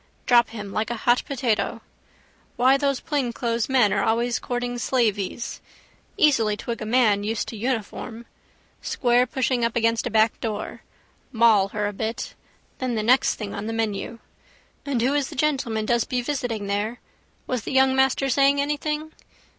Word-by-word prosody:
Drop 240 -1 +5
him 205 -3 -7
like 215 +2 -2
a 240 - -2
hot 240 +2 +2
potato. 230 -6 -1 0.7
Why 255 +2 +4
those 275 -1 0
plainclothes 240 -6 -2
men 245 -7 +4
are 200 - +1
always 235 +1 +1
courting 245 0 -3
slaveys. 230 -3 -1 0.6
Easily 225 -8 +3
twig 235 +1 -5
a 215 - -4
man 220 -4 +3
used 220 +1 -2
to - - -7
uniform. 230 0 -4 0.6
Squarepushing 250 0 +1
up 230 -1 0
against 230 0 +1
a - - -2
backdoor. 220 -1 0 0.5
Maul 225 -5 +4
her 210 +1 -3
a 205 - -2
bit. 220 +3 -4 0.5
Then 255 -2 -1
the 215 - -1
next 250 +4 +3
thing 210 -2 -6
on 205 +1 -5
the 225 - -3
menu. 225 0 -2 0.7
And 250 -5 0
who 265 +3 +2
is 290 -2 0
the - - -9
gentleman 260 -7 0
does 235 0 +2
be 250 -2 -1
visiting 245 -6 -3
there? 205 +4 -2 0.5
Was 250 -2 -2
the - - -6
young 265 0 +4
master 265 +1 +2
saying 275 +2 +3
anything? 300 +2 -2
235 Hz, 160 wpm, -24 LUFS, 220-260 Hz, 0.7 s, Drop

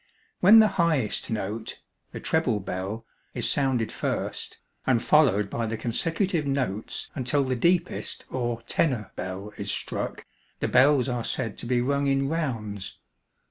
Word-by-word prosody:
When 205 +5 +8
the 220 -1 +8
highest 155 -10 0
note 110 0 -4 0.3
the - - -6
treble 140 -10 +1
bell 95 +4 -4 0.3
is - - 0
sounded 130 -5 +1
first, - - -3 0.3
and 130 -3 +4
followed 120 -9 +4
by 115 +3 -2
the 110 +1 -3
consecutive 165 - 0
notes 130 -7 -2
until 140 +1 +1
the 130 -1 -1
deepest 170 +7 0
or 120 -2 -2
'tenor' 120 - 0
bell 95 +3 -6
is 100 0 -3
struck, - - -3 0.3
the - - 0
bells 130 0 +4
are 120 -2 -2
said 115 -4 -1
to - - -3
be 120 0 +2
rung 140 +2 +1
in 135 0 +2
'rounds.' 115 - -3
125 Hz, 145 wpm, -26 LUFS, 110-145 Hz, 0.3 s, When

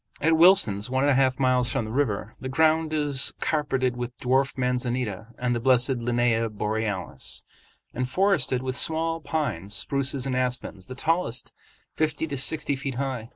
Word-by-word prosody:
At 160 +2 +3
"Wilson's," 160 - +5
one 130 +1 +1
and 145 - +4
a - - +4
half 130 -1 +2
miles 125 -2 +2
from 125 -3 -1
the 110 - -6
river, 110 -5 -1
the 130 - -5
ground 160 +2 +2
is 145 -3 +1
carpeted 135 -5 0
with 120 0 -6
dwarf 130 +2 +1
manzanita 125 -4 -2
and 125 -1 0
the 120 - -1
blessed 130 +2 +3
Linnæa 120 -1 +1
borealis, 105 -2 -3 0.5
and 125 +1 -2
forested 150 -7 +2
with 130 -1 -2
small 165 +3 +1
pines, 115 - -3
spruces, 140 +5 -1
and 130 -2 -1
aspens, 125 -7 -2
the 130 - -8
tallest 155 -5 -1 0.4
fifty 155 0 -1
to 145 -3 -4
sixty 140 +1 0
feet 135 -1 -5
high. 130 -4 -3
130 Hz, 165 wpm, -25 LUFS, 120-145 Hz, 0.5 s, Wilson's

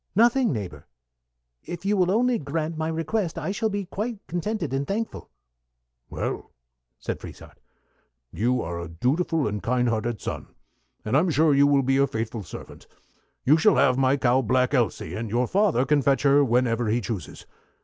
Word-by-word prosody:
"Nothing, 235 +1 +4
neighbor. 90 - -6 0.8
If 175 +2 -7
you 205 +1 +2
will 180 -2 +2
only 235 +4 +2
grant 155 +3 -3
my 160 0 -2
request 165 +3 -2
I - - -2
shall 220 +2 -1
be 205 -1 -3
quite 220 +5 -4
contented 175 -3 -3
and 135 +1 -1
thankful." 220 +3 -4 0.8
"Well," - - -4 0.5
said - - -5
Frieshardt, - - -12 0.7
"you 120 +7 0
are 85 +1 -4
a 85 - -5
dutiful 145 - 0
and 105 -1 -3
kind 125 +4 +1
hearted 115 -1 -2
son, - - -5 0.6
and 110 +4 0
I'm 165 +6 +3
sure 155 0 +3
you 140 +1 +5
will 140 -1 +3
be 135 +1 +2
a 140 0 +3
faithful 110 -1 -4
servant. - - -11 0.6
You 150 +4 +6
shall 175 +7 +4
have 130 - +4
my 135 +1 +3
cow 130 0 +3
Black 125 +1 +1
Elsy, 120 -5 0
and 115 0 -4
your 120 +4 +1
father 180 - +2
can 145 +1 +2
fetch 135 +1 +2
her 140 0 +5
whenever 120 -2 +1
he 115 +3 +1
chooses. 110 -4 -6
140 Hz, 175 wpm, -25 LUFS, 120-175 Hz, 0.8 s, You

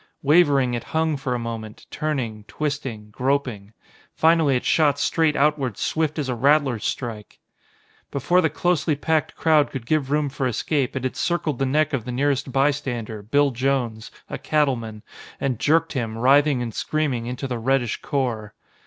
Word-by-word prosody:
Wavering, 140 -4 +4
it 120 - -3
hung 160 -1 +1
for 135 -2 -2
a - - 0
moment, 115 -2 -6
turning, 125 -9 -3
twisting, 130 -3 -4
groping. 125 -5 -1 0.4
Finally 160 -4 +4
it 125 - -2
shot 145 -3 +3
straight 160 +1 +1
outward 140 -6 +1
swift 160 -1 -1
as 145 -3 -2
a 125 - -1
rattler's 135 -2 +2
strike! 115 -4 -4 0.7
Before 175 +7 +2
the 160 - +2
closely 170 -1 0
packed 155 +2 0
crowd 155 -3 +3
could 130 -4 -6
give 145 0 0
room 150 0 +1
for 135 -1 -2
escape, 135 +3 -1
it 130 - -3
had 130 - -2
circled 165 -6 -1
the 135 - +1
neck 150 +3 +1
of 125 -5 -1
the 125 - -4
nearest 140 +1 0
bystander, 130 -6 -1
Bill 140 +7 +2
Jones, 125 -3 -1 0.2
a - - -6
cattleman, 120 -8 -1 0.4
and 130 -5 -1
jerked 165 +2 +2
him, 115 -5 -3
writhing 135 +1 +4
and 115 -2 -5
screaming, 135 -6 -1
into 125 +2 -4
the 125 -2 -3
reddish 125 -1 0
core. 115 -6 -2
135 Hz, 165 wpm, -23 LUFS, 120-150 Hz, 0.7 s, Wavering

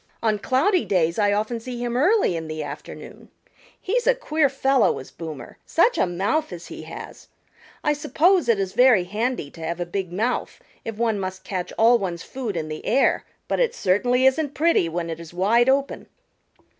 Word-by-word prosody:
On 215 -2 +1
cloudy 325 - +2
days 170 -1 +1
I 205 -1 +3
often 215 +3 -1
see 245 +2 -7
him 240 0 -2
early 345 - +3
in 160 -1 -4
the 155 0 -4
afternoon. 145 0 -9 0.5
He's 475 +5 -1
a - - +5
queer 310 - +1
fellow, 270 -1 +2
is 130 - -10
Boomer. 160 -3 -9
Such - - +2
a - - +3
mouth 200 - -1
as 175 -1 -8
he - - -8
has! - - -10 0.6
I 300 - +2
suppose 315 +2 +2
it 225 -4 +3
is 190 -1 -2
very 245 -4 +5
handy 210 - -3
to 165 - -13
have 170 +2 -3
a 175 - -1
big 180 0 -4
mouth 220 +7 -2 0.2
if 225 - -5
one 225 -3 0
must 185 0 -5
catch 185 -2 -4
all 235 +2 +5
one's 175 -4 -4
food 235 -8 -5
in 155 -1 -3
the 155 0 -6
air, 265 +4 +2 0.2
but - - -1
it 480 -1 +1
certainly 245 - +2
isn't 275 +2 +2
pretty 315 - +2
when 170 +1 -3
it 165 0 -5
is 170 +1 -11
wide 230 +7 +3
open." 275 +1 0
220 Hz, 195 wpm, -23 LUFS, 175-270 Hz, 0.6 s, a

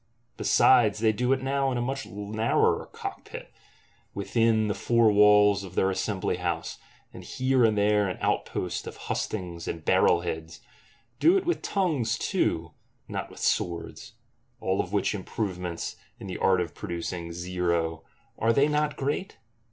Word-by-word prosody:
Besides 115 -5 +4
they 110 0 +3
do 125 +4 0
it 130 -1 +1
now 135 0 0
in 125 - -1
a - - -1
much 135 +2 -3
narrower 105 +3 0
cockpit; - - -8 0.6
within 110 +2 +2
the 105 - 0
four 115 +2 +3
walls 105 -1 +5
of 95 -2 -10
their 95 - +2
Assembly 95 -1 -2
House, 85 -2 -3 0.3
and - - -10
here 130 -1 +1
and 110 -2 +3
there 105 0 +3
an 90 - -4
outpost - - -2
of - - -8
Hustings 90 -5 -4
and 80 -1 -5
Barrel 85 - +4
heads; 80 -1 -5 0.6
do 350 +4 +5
it 380 - -2
with 350 - 0
tongues 145 - 0
too, 80 -5 -1 0.4
not - - -4
with - - -14
swords:—all 90 +2 -3
which 100 +3 0
improvements, 90 -3 -4 0.2
in - - -10
the 95 - -5
art 95 -1 +3
of 85 - -4
producing 85 0 -5
zero, 85 -2 -2 0.4
are 115 +1 +3
they 140 +3 +4
not 150 0 0
great? 145 +8 -3
105 Hz, 150 wpm, -27 LUFS, 90-120 Hz, 0.6 s, walls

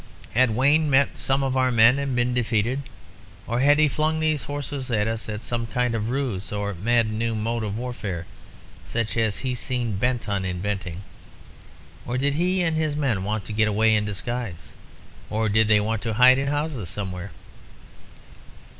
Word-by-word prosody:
Had 120 -2 +3
Wayne 145 +5 +3
met 140 0 +3
some 135 +1 +1
of 135 -1 -1
our 130 -1 +2
men 120 +3 +5
and 140 -2 -2
been 125 0 +1
defeated? 120 +2 0 0.6
Or 120 +1 -1
had 145 +3 +5
he 155 0 +5
flung 155 +3 0
these 155 -2 +1
horses 145 -2 -5
at 105 -3 +1
us 115 0 -3
as 105 +1 -5
some 120 -1 -2
kind 125 +2 0
of 110 0 -2
ruse 125 -8 -2
or 105 0 -2
mad 115 +4 +1
new 115 +1 -1
mode 115 +1 -2
of 105 0 -3
warfare, 110 -8 -5 0.6
such 115 -2 -3
as 110 -3 +1
he 130 - 0
seemed 120 -4 -2
bent 120 +1 0
on 100 -2 -1
inventing? 95 -1 -3 1.0
Or 125 - -3
did 140 +2 +1
he 180 +4 +1
and 165 -2 +1
his 155 -2 0
men 130 -10 0
want 105 0 -2
to 110 - -5
get 110 +1 +2
away 110 +1 +3
in 105 - +1
disguise? 105 -5 -5 0.6
Or 110 0 0
did 110 +1 +3
they 105 -1 +5
want 110 +1 -1
to 115 -2 -2
hide 130 +2 +7
in 140 - -1
houses 145 - -2
somewhere? 95 0 -5
115 Hz, 180 wpm, -24 LUFS, 105-135 Hz, 1.0 s, hide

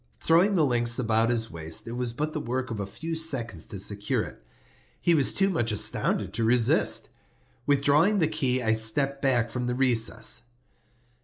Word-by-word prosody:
Throwing 180 +5 +3
the 160 -4 +3
links 120 -2 +1
about 115 -1 +1
his 115 -2 -1
waist, 80 +2 -5
it - - -5
was 120 0 -3
but 150 +6 -4
the 155 - -3
work 130 -1 -4
of 110 - -4
a 100 - -4
few 165 +10 -5
seconds 120 - -2
to 100 - -7
secure 100 +1 -1
it. - - -11 0.6
He 170 - +2
was 145 -5 +3
too 195 - +1
much 120 -10 0
astounded 100 -2 0
to 115 +2 -2
resist. 115 0 +2 0.6
Withdrawing 145 +8 +3
the 165 -5 +2
key 130 -5 -1
I 110 -1 +2
stepped 135 +6 0
back 125 -4 +1
from 125 -1 -3
the 125 - -1
recess. 120 -2 +1
125 Hz, 180 wpm, -26 LUFS, 115-145 Hz, 0.6 s, Throwing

